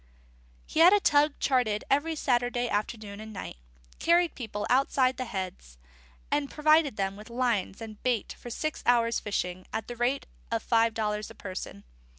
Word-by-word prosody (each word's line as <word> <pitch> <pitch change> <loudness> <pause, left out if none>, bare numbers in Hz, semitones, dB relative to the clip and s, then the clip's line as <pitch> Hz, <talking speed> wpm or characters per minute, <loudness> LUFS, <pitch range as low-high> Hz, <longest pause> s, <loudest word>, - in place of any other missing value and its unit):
_ - - -30 0.6
He - - -3
had 350 +4 +8
a 415 - +5
tug 295 -4 +3
chartered 245 -6 +1
every 305 +4 +1
Saturday 245 -3 +1
afternoon 210 -1 -3
and 220 0 -8
night, 195 - -7 0.4
carried 340 0 +3
people 215 -4 -5
outside 260 0 +2
the 255 - -3
Heads, 185 - -6 0.5
and 285 -1 +1
provided 305 -4 +3
them 195 -1 -1
with 210 +2 -11
lines 235 -5 -1
and 215 -2 -9
bait 245 -4 0
for 240 - -8
six 310 +6 -3
hours' 235 -1 +3
fishing, 185 -3 -3
at 220 - -3
the 240 - -6
rate 245 +4 0 0.2
of 230 -1 -1
five 230 -1 +2
dollars 210 -1 -2
a - - -12
person. 185 - -7
235 Hz, 170 wpm, -28 LUFS, 210-275 Hz, 0.6 s, had